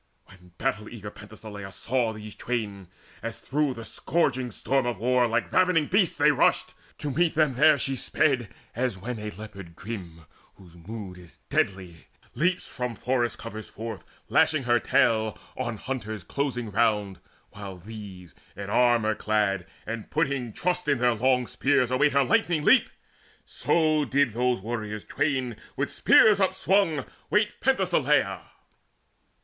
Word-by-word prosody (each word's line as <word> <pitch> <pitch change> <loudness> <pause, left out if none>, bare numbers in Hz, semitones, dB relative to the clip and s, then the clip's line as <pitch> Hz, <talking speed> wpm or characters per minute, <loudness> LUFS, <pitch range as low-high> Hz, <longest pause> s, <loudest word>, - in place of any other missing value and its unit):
When 90 -2 -19
battle 110 -6 -2
eager 105 -3 -8
Penthesileia 105 -1 -10
saw 120 +3 -1
These 105 -1 -9
twain, 105 -6 -4 0.3
as 115 0 -5
through 145 -1 -1
the 115 -1 -8
scourging 130 -5 0
storm 130 +3 0
of 120 - -2
war 125 +3 +2
Like 115 - -1
ravening 180 -4 +3
beasts 185 +1 +2
they - - +5
rushed, - - +2 0.2
to 145 - -3
meet 165 +4 +1
them 155 -3 +3
there 150 +4 +5
She 135 -1 -1
sped, 125 -2 +1 0.3
as 125 -4 -1
when 115 +4 -5
a 105 0 -4
leopard 100 -5 -10
grim, 85 -6 -8 0.3
whose 90 -3 -17
mood 95 +1 -8
Is 90 -2 -16
deadly, 90 -4 -1 0.3
leaps 180 +3 0
from 125 -2 -4
forest 120 -1 -1
coverts 110 -1 -8
forth, 110 -1 -7 0.2
Lashing 155 -3 +3
her 120 -1 +3
tail, 110 -3 +2 0.2
on 120 -3 -3
hunters 110 -5 -5
closing 125 - -3
round, 105 -3 +1 0.3
While 100 -2 -8
these, 95 -3 -10 0.2
in 100 0 -6
armour 120 -3 +3
clad, 105 -4 0 0.2
and 115 -2 -5
putting 140 -6 -1
trust 180 - -1
In 140 -2 +3
their 120 0 +3
long 125 +2 +2
spears, 130 0 +1
await 140 +3 +3
her 140 0 +4
lightning 175 -5 +2
leap; 260 - +5 0.6
So 155 -3 +1
did 135 -2 +2
those 125 -2 +1
warriors 105 -1 -4
twain 130 -5 -1 0.2
with - - -1
spears 210 -2 +6
upswung 190 -5 +2 0.2
Wait 210 0 +1
Penthesileia. 150 - +2
120 Hz, 145 wpm, -26 LUFS, 105-140 Hz, 0.6 s, spears